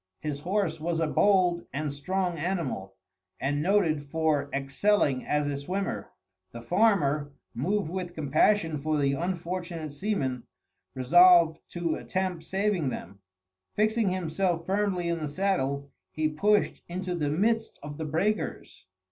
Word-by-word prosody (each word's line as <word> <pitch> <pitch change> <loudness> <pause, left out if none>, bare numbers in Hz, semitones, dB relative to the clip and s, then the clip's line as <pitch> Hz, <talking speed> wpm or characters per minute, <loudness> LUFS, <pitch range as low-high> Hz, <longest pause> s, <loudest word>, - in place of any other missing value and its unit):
His 150 -2 -4
horse 175 -1 -1
was 165 0 -1
a 165 - +2
bold 180 0 +2
and 145 0 -3
strong 180 +5 -1
animal, 145 - -3 0.4
and 145 +2 0
noted 170 -5 +2
for 155 -2 +1
excelling 140 +1 +1
as 150 0 +1
a 145 -1 -2
swimmer. 185 +8 -3 0.4
The 115 0 -8
farmer, 150 - +2 0.2
moved 185 - -1
with 180 -1 -4
compassion 160 +2 +2
for 155 +2 0
the 140 -1 +2
unfortunate 170 -1 -3
seamen, 140 - -2 0.5
resolved 170 +4 +6
to 170 -2 -1
attempt 185 -3 -3
saving 190 -6 0
them. 100 -4 -7 0.6
Fixing 215 0 +2
himself 175 -1 -1
firmly 195 -2 0
in 170 0 -1
the 155 - -3
saddle, 140 -5 -1 0.2
he 155 0 0
pushed 205 +8 +1
into 180 +1 -3
the 155 -4 -1
midst 220 +8 0
of 145 +1 -7
the 160 - -2
breakers. 170 - -2
165 Hz, 135 wpm, -28 LUFS, 145-190 Hz, 0.6 s, resolved